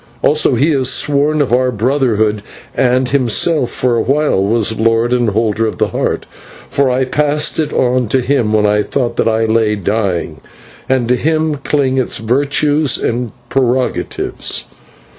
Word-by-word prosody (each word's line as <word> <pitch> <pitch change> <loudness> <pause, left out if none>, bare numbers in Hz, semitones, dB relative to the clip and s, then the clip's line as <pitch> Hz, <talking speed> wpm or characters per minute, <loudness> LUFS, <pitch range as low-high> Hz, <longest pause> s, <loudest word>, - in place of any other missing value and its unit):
Also 150 -3 +3
he 145 +7 +2
is 130 -3 +1
sworn 145 +2 +1
of 125 - -3
our 130 +1 +2
brotherhood, 110 -3 0 0.3
and 125 0 +1
himself, 135 +2 +1
for 125 -2 -1
a 115 - +1
while, 140 -7 +1
was 110 +1 0
Lord 115 +2 +2
and 120 -2 +1
Holder 110 +1 0
of 110 - -5
the - - 0
Heart, - - -2 0.4
for 140 -1 +1
I 130 +1 +1
passed 150 +4 0
it 155 -2 -1
on 125 -1 +1
to 130 - +1
him 125 -4 0
when 105 -1 +2
I 105 0 +2
thought 120 +4 -2
that - - +1
I 115 0 +1
lay 110 -1 +1
dying, 95 -6 -2 0.5
and 130 -3 +1
to 125 - +2
him 155 +3 0
cling 135 -2 0
its 130 - -1
virtues 145 +4 +1
and 120 -1 -2 0.2
prerogatives. 130 -1 -2
125 Hz, 160 wpm, -14 LUFS, 110-140 Hz, 0.5 s, Also